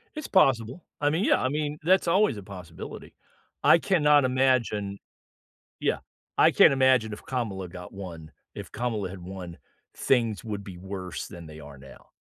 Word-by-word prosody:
It's 305 -2 -5
possible. 135 - +2 0.2
I 145 0 +2
mean, 170 +7 0
yeah, - - +3
I 130 - +1
mean, 150 +1 -2
that's 180 +1 +3
always 190 - +3
a 100 - -7
possibility. 90 -4 -10 0.5
I - - +7
cannot 150 -6 +4
imagine 125 -6 +1 0.8
Yeah, - - 0 0.4
I - - +7
can't - - +6
imagine 130 -4 +3
if 105 - -9
Kamala 105 -8 -3
got 90 0 -10
won. 85 -5 -9 0.2
If - - -9
Kamala 110 -5 -2
had 95 - -9
won, 90 -2 -8 0.4
things 115 -7 +1
would 105 -3 -5
be 95 -2 -9
worse 95 -2 -6
than 85 -4 -10
they 80 0 -11
are 70 -1 -12
now. 65 0 -15
110 Hz, 165 wpm, -27 LUFS, 90-135 Hz, 0.8 s, I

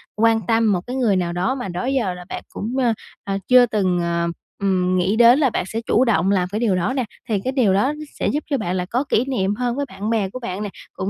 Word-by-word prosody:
quan 225 +1 +3
tâm 225 -2 +3
một 180 - +1
cái 250 - -4
người 235 -7 +2
nào 175 -2 -1
đó 185 +8 0
mà 250 -6 -5
đó 180 +4 -4
giờ 255 -8 0
là 180 0 -10
bạn - - -5
cũng, 230 +5 -5 0.5
ờ, 195 0 -2
chưa 250 -1 +7
từng, 190 -6 0
ờ, 170 0 0 0.3
ừm, 185 -2 +1
nghĩ 185 +4 +1
đến 240 +4 +6
là 275 -4 +3
bạn - - -1
sẽ 220 +4 -4
chủ 250 - +3
động 195 -5 +2
làm 180 -2 +1
cái 215 - -2
điều 220 -6 +2
đó 180 +8 0
nè. 260 -3 -1 0.2
Thì 210 -3 +1
cái 260 - -1
điều 245 -8 +2
đó 235 +9 +2 0.3
sẽ - - 0
giúp 295 - -1
cho 280 - +1
bạn 185 -5 -2
là 180 -1 -1
có 245 +8 -1
kỷ 235 - +2
niệm 205 -7 -1
hơn 245 +1 -1
với 285 +1 -1
bạn 210 +3 -5
bè 215 -4 0
của 255 - -7
bạn 205 -4 -4
nè, 205 - -3 0.2
cũng 190 - -3
210 Hz, 270 wpm, -21 LUFS, 185-245 Hz, 0.5 s, chưa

